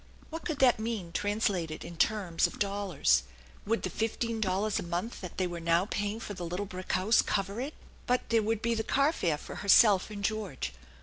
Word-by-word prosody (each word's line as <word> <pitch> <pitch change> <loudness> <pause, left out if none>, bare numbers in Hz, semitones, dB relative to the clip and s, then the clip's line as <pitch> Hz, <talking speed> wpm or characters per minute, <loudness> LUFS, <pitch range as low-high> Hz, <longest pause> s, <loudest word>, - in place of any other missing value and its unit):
What 325 +1 -6
could 315 -4 -2
that 255 -4 +5
mean 220 -6 -3
translated 195 -5 -1
in 170 - -8
terms 185 -2 +2
of - - -10
dollars? 195 - +2 0.5
Would 230 +2 0
the - - -1
fifteen 225 0 -2
dollars 200 +2 0
a - - -2
month 175 +7 -4
that 180 -3 -8
they 185 - +1
were 175 -1 -4
now 170 +2 +2
paying 205 +1 -2
for 210 - -6
the 180 -2 -6
little 180 +4 -3
brick 185 -1 -5
house 195 +5 +4
cover 200 +3 -1
it? 285 +4 -5 0.3
But 250 0 +1
there 230 -1 +4
would 220 0 -1
be 235 0 +2
the 225 - 0
car 280 +7 +2
fare 165 - 0
for - - -9
herself 200 -1 +5
and 205 -1 -7
George. 195 - -2
205 Hz, 205 wpm, -30 LUFS, 180-225 Hz, 0.5 s, that